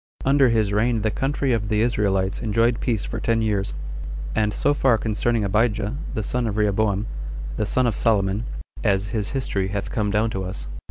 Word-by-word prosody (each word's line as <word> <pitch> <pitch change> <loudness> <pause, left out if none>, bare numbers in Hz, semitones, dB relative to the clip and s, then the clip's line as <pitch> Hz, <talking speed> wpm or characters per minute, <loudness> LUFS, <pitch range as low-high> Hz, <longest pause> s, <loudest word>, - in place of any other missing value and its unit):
Under 135 -1 +5
his 110 -3 +2
reign 115 +1 +2
the 110 - +1
country 135 0 0
of 105 -3 -1
the 105 -1 +2
Israelites 100 -5 +1
enjoyed 115 +1 +2
peace 115 -5 -1
for - - -4
ten 115 -1 +1
years. 100 -5 0 0.6
4. 110 - +2
And 105 - 0
so 145 - +1
far 130 -5 +3
concerning 110 +1 0
Abijah, 105 +2 +1 0.2
the 110 - -1
son 120 +2 -1
of 105 -1 -2
Rehoboam, 105 0 +1 0.5
the 105 - -1
son 130 +3 +2
of 115 -4 +1
Solomon, 105 0 +1 0.4
as 100 -2 +1
his 105 -3 -2
history 100 -8 -1
hath 100 +1 -3
come 105 -2 0
down 110 +2 +1
to 95 -2 -3
us. 95 +1 -5
110 Hz, 195 wpm, -23 LUFS, 100-115 Hz, 0.6 s, Under